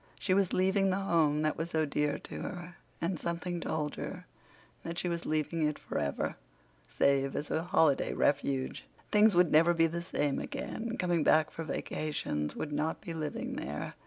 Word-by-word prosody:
She 185 - +1
was 195 -1 +3
leaving 190 +1 +3
the 185 - +2
home 165 -6 +2
that 155 - 0
was 165 +2 -2
so 160 -2 +1
dear 150 0 0
to - - -8
her, 175 -1 -6 0.2
and 170 0 -1
something 170 +1 -3
told 150 -2 -2
her - - -6 0.6
that 170 0 -5
she 180 - 0
was 170 -1 -2
leaving 155 +1 +1
it 150 - -2
forever, 70 -1 -2 0.5
save 135 -1 +2
as 145 - -3
a 160 - +1
holiday 160 -4 +3
refuge. 135 -2 0 0.3
Things 210 -1 +5
would 175 -2 +5
never 165 +3 +5
be 165 0 +5
the 170 +1 -2
same 145 -5 -1
again; 230 +1 -4
coming 175 -3 +1
back 155 +1 +4
for 165 - -5
vacations 145 - -3
would 150 - -4
not 155 +2 -1
be 170 - -6
living 230 - -4
there. - - -4
165 Hz, 180 wpm, -31 LUFS, 150-180 Hz, 0.6 s, Things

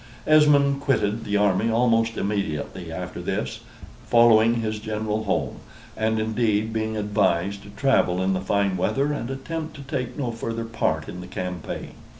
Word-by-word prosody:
Esmond 145 -2 +5
quitted 115 -5 0
the 105 -1 +1
army 100 +2 +2
almost 115 -1 +2
immediately 100 -7 -3
after - - -6
this, - - -3 0.5
following 115 -1 +5
his 110 -1 -2
general 110 0 -2
home; 100 - -1 0.4
and, 110 0 0
indeed, 110 -1 0
being 110 0 -2
advised 100 -2 0
to 100 - -13
travel 105 -5 +2
in 95 +1 +1
the 95 - -1
fine 100 0 +1
weather 140 +10 +1
and 120 -4 -4
attempt 155 +4 -5
to 140 - -9
take 130 -3 -4
no 130 -5 -2
further 115 0 -4
part 80 -8 -1
in 90 - -7
the 90 - -9
campaign. 90 -2 -5
110 Hz, 160 wpm, -24 LUFS, 100-120 Hz, 0.5 s, Esmond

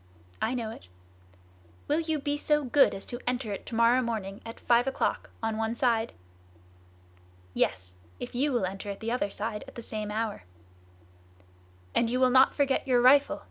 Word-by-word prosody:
"I 245 - 0
know 230 -3 -3
it." 95 - -12 1.0
"Will 300 +2 +2
you 320 -1 -1
be 290 0 -1
so 295 0 +1
good 275 +2 +4
as 195 - -8
to 240 - -6
enter 245 -4 -1
it 195 - -8
to 230 - -5
morrow 235 +2 +4
morning 215 -5 -4
at 230 0 -9
five 240 +1 +3
o'clock, 270 - -1
on 225 -1 -1
one 225 +1 -1
side?" 235 -2 +1 1.4
"Yes! 90 0 -1 0.3
if - - -6
you 275 +4 +1
will 240 -7 +1
enter 195 +2 -5
at 200 - -5
the 225 +1 -3
other 240 -4 0
side 210 +1 -4
at - - -13
the 235 - -6
same 215 -1 -4
hour." 215 - -3 1.5
"And 235 - +2
you 250 +2 0
will 255 -1 +4
not 260 +1 +5
forget 275 -1 +1
your 250 -2 +4
rifle?" 275 +4 +5
235 Hz, 180 wpm, -28 LUFS, 220-260 Hz, 1.5 s, not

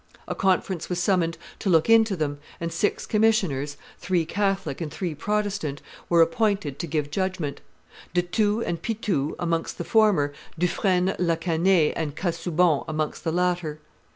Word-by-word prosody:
A - - -2
conference 185 -2 0
was 180 -1 -1
summoned 175 -3 +1 0.2
to 200 - -1
look 165 -3 +4
into 225 -2 +5
them, 145 -3 -2 0.2
and 170 0 -3
six 190 +5 0
commissioners, 190 - +1 0.2
three 180 -3 0
Catholic 195 0 -1
and 155 -3 -3
three 175 -1 -3
Protestant, 195 -4 -2 0.3
were 170 -1 +6
appointed 195 - 0
to 170 - -3
give 150 -2 -2
judgment; 185 -5 -2 0.5
De 175 - +3
Thou 210 +5 +1
and 170 -6 -2
Pithou 200 -10 -1
amongst 165 -1 -2
the - - -3
former, 195 -10 +3 0.2
Dufresne 180 +2 +1
la 170 -2 +2
Canaye 165 0 +2
and 155 -3 -3
Casaubon 170 -2 +1
amongst 155 -1 -3
the 165 - 0
latter. 175 -3 0
175 Hz, 155 wpm, -25 LUFS, 160-195 Hz, 0.5 s, were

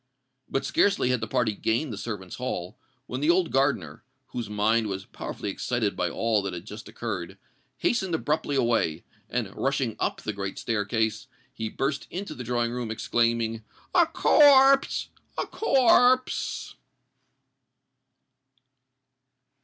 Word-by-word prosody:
But 135 - -1
scarcely 195 -11 +2
had 125 -2 0
the 110 - -2
party 120 -2 +1
gained 115 +6 -1
the - - -4
servants' 100 -4 -6
hall, 100 -5 -4 0.3
when 130 0 -5
the 150 - +2
old 175 0 +3
gardener, 100 - 0 0.3
whose 120 -3 -5
mind 110 +2 +2
was 95 -1 -4
powerfully - - -5
excited - - -1
by - - 0
all 115 -2 +1
that 95 -2 -4
had 85 +1 -8
just 105 +1 -9
occurred, 100 -7 -5 0.4
hastened 190 -8 0
abruptly 150 -2 -1
away; 115 - +1 0.3
and, - - -3
rushing - - -1
up - - -1
the 110 - -3
great 100 -1 -5
staircase, 110 +1 -1 0.3
he 110 -4 -4
burst 140 +4 -2
into 195 +3 -5
the 125 - -7
drawing 120 0 0
room, 120 -2 -4
exclaiming, 115 0 0 0.3
"A 345 -3 +5
corpse! 275 -4 +5 0.3
a - - 0
corpse!" 255 - +2
115 Hz, 135 wpm, -26 LUFS, 105-150 Hz, 0.4 s, A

